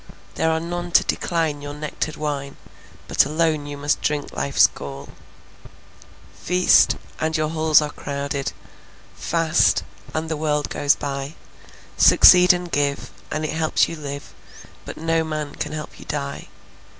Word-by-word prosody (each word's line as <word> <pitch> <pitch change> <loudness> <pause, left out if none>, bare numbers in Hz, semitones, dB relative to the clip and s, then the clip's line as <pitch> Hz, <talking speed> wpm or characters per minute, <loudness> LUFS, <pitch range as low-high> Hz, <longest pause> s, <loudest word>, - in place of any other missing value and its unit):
There 160 - 0
are 160 0 +1
none 175 +1 -5
to - - +6
decline 160 -4 -1
your 145 0 -7
nectared 150 +1 -4
wine, 140 -2 -4 0.5
But - - +4
alone 155 0 0
you 145 0 -6
must 145 +1 -1
drink 150 -1 -2
life's 140 - +3
gall. 70 0 -5 1.2
Feast, 180 +1 +3 0.2
and 160 +1 0
your 155 0 -1
halls 155 -1 +3
are 150 - -4
crowded; 140 -1 -4 0.6
Fast, 165 -2 +2 0.3
and 160 +1 -3
the 160 - -2
world 150 -1 -1
goes 145 0 +2
by. 140 +1 -5 0.6
Succeed 180 0 +7
and 175 -1 -3
give, 140 0 -1 0.2
and 155 0 -3
it 155 - -3
helps 160 -1 +1
you 165 - -6
live, 140 -2 -7 0.5
But - - -8
no 165 0 0
man 155 -2 -4
can - - -5
help 155 -1 -7
you - - -12
die. 140 -1 -5
150 Hz, 150 wpm, -22 LUFS, 145-160 Hz, 1.2 s, Succeed